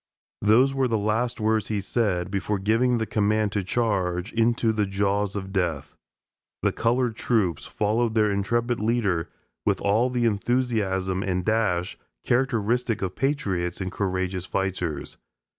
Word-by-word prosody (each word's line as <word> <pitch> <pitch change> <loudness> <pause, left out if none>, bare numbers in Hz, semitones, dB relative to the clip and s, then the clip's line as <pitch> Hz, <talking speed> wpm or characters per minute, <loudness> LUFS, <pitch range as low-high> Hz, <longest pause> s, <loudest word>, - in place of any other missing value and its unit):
Those 120 +6 +4
were 135 -1 +1
the 115 -2 +1
last 110 +4 0
words 110 -1 +1
he 105 -2 -1
said, 95 -3 -1
before 100 +1 -1
giving 115 +5 +2
the 110 - -1
command 105 0 +1
to 100 -2 -1
charge, 95 -3 -1
"into 115 0 +2
the 105 -2 0
jaws 100 +1 0
of 95 -1 -5
death." 85 -7 -2 0.7
The - - +3
colored 120 0 0
troops 105 -8 0
followed 110 +2 0
their 105 -2 +3
intrepid 120 +4 0
leader 105 -7 0 0.3
with - - +1
all 110 +5 +2
the 125 -1 0
enthusiasm 105 -5 0
and 90 -2 -1
dash 105 -6 0 0.3
characteristic 120 -2 +1
of 95 -1 -2
patriots 100 -11 -1
and 95 -1 -3
courageous 95 -1 -2
fighters. 90 -6 -3
105 Hz, 140 wpm, -25 LUFS, 95-115 Hz, 0.7 s, Those